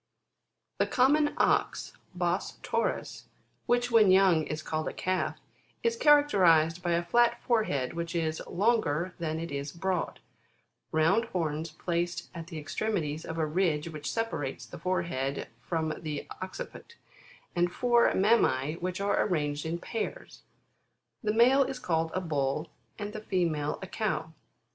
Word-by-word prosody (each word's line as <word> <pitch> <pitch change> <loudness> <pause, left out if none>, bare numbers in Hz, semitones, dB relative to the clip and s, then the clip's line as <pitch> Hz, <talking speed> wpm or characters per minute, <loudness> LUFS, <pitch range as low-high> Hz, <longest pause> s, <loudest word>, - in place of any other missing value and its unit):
9. - - +3
The - - -15
Common 295 +4 +4
Ox, - - +1 0.3
Ens 175 +1 0
7'ot/n/s - - -2 0.4
which 245 0 +2
when 220 -4 +6
young, 185 -4 +5
is 155 0 -4
called 155 0 -2
a - - -3
6V///, 185 0 -1 0.5
is 465 0 +2
characterised 185 - +5
by 175 -1 0
a 170 +1 +1
flat 240 +6 +3
forehead 215 - +1
which 170 0 -4
is 160 -2 -1
longer 185 -5 +1
than 160 -1 -2
it 165 -1 -5
is 140 0 -4
broad; 180 +2 -2 0.7
round 160 +9 +3
horns 165 -5 -2
placed 170 +2 -3
at 165 -2 -7
the 170 - -9
two - - -3
extremities 160 -2 -2
of 165 - -5
a 160 - +1
ridge 160 -1 0
which 150 -2 -5
separates 225 -12 -3
the - - -10
forehead 140 -7 -2
from 160 +3 -1
the 150 -3 -4
occiput, 190 - -7 0.6
and 175 0 +2
four 240 +3 +3
mammae 165 - +3
which 180 +1 -3
are 200 0 +1
arranged 150 -5 -1
in 165 +1 -2
pairs 220 +5 -5 0.8
The 210 - 0
male 245 +5 +5
is 265 0 -4
called 165 -8 0
a 185 - 0
Ball 150 -1 -1 0.3
and 210 0 -5
the 215 - -6
female 165 -7 0
a - - -5
Cow. 200 -6 -2
170 Hz, 150 wpm, -29 LUFS, 155-210 Hz, 0.8 s, when